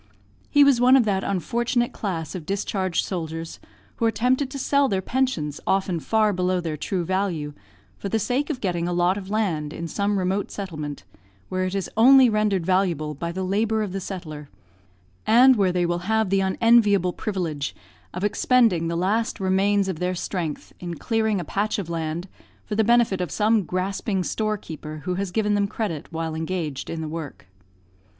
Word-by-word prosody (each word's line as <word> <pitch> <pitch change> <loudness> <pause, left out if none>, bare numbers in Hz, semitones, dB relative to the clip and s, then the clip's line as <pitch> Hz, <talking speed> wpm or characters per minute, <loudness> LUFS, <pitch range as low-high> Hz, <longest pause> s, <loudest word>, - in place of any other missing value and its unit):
He 290 -1 +6
was 275 -4 +4
one 255 +2 +7
of 245 - +3
that 195 -2 0
unfortunate 235 +5 0
class 165 -7 -4
of 180 - -5
discharged 195 -2 -1
soldiers 165 -2 -5 0.4
who 230 - 0
are - - +5
tempted 250 +5 +1
to 275 - -6
sell 280 +1 +2
their 195 - +1
pensions 190 - -1
often 190 -3 +1
far 215 +4 +2
below 180 0 0
their 165 -3 -3
true 175 +3 -2
value, 175 -6 -1 0.5
for 200 - -4
the 225 - +1
sake 250 +7 -1
of 270 -5 -3
getting 175 -3 -1
a 175 - -1
lot 175 +2 +2
of 195 -1 -7
land 180 -9 -1
in 170 +1 -5
some 200 +4 0
remote 190 +2 -1
settlement, 155 -7 -6 0.5
where 185 0 -1
it 185 +1 -3
is 195 - -2
only 255 +2 +7
rendered 210 -5 +1
valuable 175 -5 +1
by 170 +4 -4
the 190 +2 -3
labour 215 +3 +1
of 205 - -4
the 195 - -3
settler, 155 -6 -7 0.8
and 250 +4 +7
where 195 -4 +2
they 180 -1 +1
will 175 0 0
have 220 -3 +2
the 195 0 +3
unenviable 200 -2 +3
privilege 165 -9 -3 0.4
of 180 - -5
expending 210 -5 +3
the 170 0 -2
last 210 +6 0
remains 195 +1 +2
of 185 -5 -3
their 180 +1 -1
strength 170 -4 -4
in 175 -1 -5
clearing 220 +2 0
a 175 - -4
patch 205 +7 -1
of 180 -5 -4
land 165 +2 -3 0.4
for - - -5
the 220 +1 +3
benefit 235 -4 +3
of 180 - -2
some 215 +6 +2
grasping 190 +2 -2
storekeeper 165 -8 -4
who 180 - -1
has 195 +1 -2
given 210 +2 0
them 205 -1 +2
credit 195 -8 -4
while 165 -1 -3
engaged 160 -3 -3
in 165 - -4
the 160 - -4
work. 155 -2 -7
190 Hz, 185 wpm, -24 LUFS, 170-215 Hz, 0.8 s, one